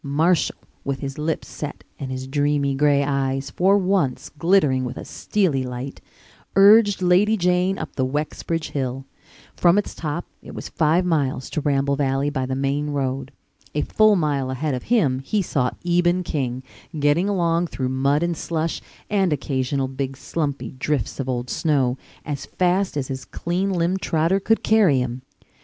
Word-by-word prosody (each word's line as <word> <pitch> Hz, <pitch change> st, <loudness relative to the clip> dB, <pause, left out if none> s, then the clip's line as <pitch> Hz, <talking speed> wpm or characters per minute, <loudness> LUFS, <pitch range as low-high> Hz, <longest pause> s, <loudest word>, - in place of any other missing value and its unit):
Marshall, 155 Hz, +4 st, +2 dB, 0.3 s
with 135 Hz, -1 st, -3 dB
his 135 Hz, +1 st, -5 dB
lips 155 Hz, +1 st, -2 dB
set 150 Hz, -1 st, -7 dB, 0.2 s
and 135 Hz, -, -5 dB
his 130 Hz, 0 st, -4 dB
dreamy 145 Hz, 0 st, +1 dB
gray 140 Hz, 0 st, +3 dB
eyes 135 Hz, -1 st, -1 dB
for 195 Hz, +6 st, +3 dB
once 185 Hz, -9 st, 0 dB
glittering 150 Hz, -6 st, +3 dB
with 125 Hz, 0 st, -5 dB
a -, -, -7 dB
steely 180 Hz, -10 st, 0 dB
light, 125 Hz, +1 st, -6 dB, 0.5 s
urged 205 Hz, 0 st, +6 dB
Lady 195 Hz, +5 st, +4 dB
Jane 180 Hz, +1 st, +2 dB
up 160 Hz, -, -6 dB
the 130 Hz, -, 0 dB
Wexbridge 150 Hz, +4 st, -2 dB
hill. 130 Hz, -1 st, -3 dB, 0.5 s
From 175 Hz, +2 st, +4 dB
its 205 Hz, -, -1 dB
top 160 Hz, +2 st, -4 dB, 0.2 s
it -, -, -11 dB
was -, -, -6 dB
five 165 Hz, +3 st, +2 dB
miles 140 Hz, -7 st, 0 dB
to 155 Hz, -, -1 dB
Ramble 140 Hz, -1 st, +1 dB
Valley 135 Hz, +1 st, 0 dB
by 130 Hz, -3 st, -2 dB
the 130 Hz, -, -2 dB
main 140 Hz, +2 st, -1 dB
road. 135 Hz, -2 st, -2 dB, 0.4 s
A 150 Hz, -, +2 dB
full 215 Hz, -1 st, +4 dB
mile 145 Hz, -6 st, 0 dB
ahead 135 Hz, +3 st, -2 dB
of 125 Hz, -, -2 dB
him 155 Hz, -, +3 dB
he 195 Hz, +9 st, -1 dB
saw 125 Hz, -6 st, 0 dB, 0.2 s
Eben 175 Hz, +1 st, +2 dB
King, 130 Hz, -6 st, -3 dB, 0.4 s
getting 145 Hz, +7 st, +2 dB
along 170 Hz, -3 st, +1 dB
through 130 Hz, -5 st, -3 dB
mud 140 Hz, +4 st, +1 dB
and 170 Hz, 0 st, 0 dB
slush, 160 Hz, 0 st, -2 dB, 0.3 s
and 195 Hz, -4 st, +1 dB
occasional 135 Hz, -1 st, -1 dB
big 135 Hz, 0 st, -4 dB
slumpy 145 Hz, -2 st, -3 dB
drifts 135 Hz, 0 st, -2 dB
of 135 Hz, -1 st, -2 dB
old 125 Hz, -1 st, -2 dB
snow, 135 Hz, -4 st, +1 dB, 0.3 s
as 145 Hz, -2 st, -4 dB
fast 185 Hz, -1 st, 0 dB
as 135 Hz, -2 st, -2 dB
his 130 Hz, -1 st, -4 dB
clean 180 Hz, +3 st, -2 dB
limbed 180 Hz, +1 st, 0 dB
trotter 165 Hz, +4 st, +1 dB
could 225 Hz, +3 st, +1 dB
carry 210 Hz, -10 st, +4 dB
him. 125 Hz, 0 st, -2 dB
145 Hz, 170 wpm, -22 LUFS, 135-175 Hz, 0.5 s, urged